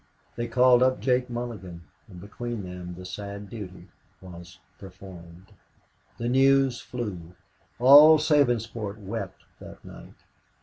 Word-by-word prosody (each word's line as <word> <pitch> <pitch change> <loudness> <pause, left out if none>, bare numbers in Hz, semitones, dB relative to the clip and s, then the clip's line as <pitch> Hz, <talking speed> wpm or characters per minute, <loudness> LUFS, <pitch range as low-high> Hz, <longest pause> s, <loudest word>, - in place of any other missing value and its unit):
They 120 0 -4
called 125 +1 +4
up 130 0 +2
Jake 125 -1 0
Mulligan, 105 -8 -7 0.2
and 90 -4 -13
between 110 +3 -7
them 90 -1 -8
the 90 +1 -11
sad 100 +2 -8
duty 100 -5 -10 0.3
was 90 0 -13 0.2
performed. 95 -1 -14 0.6
The 120 - -4
news 135 0 +3
flew. 95 -8 -7 0.4
All 145 +5 +8
Sabinsport 120 -9 0
wept 100 -1 -7 0.2
that - - -13
night. - - -13
105 Hz, 120 wpm, -25 LUFS, 95-125 Hz, 0.6 s, All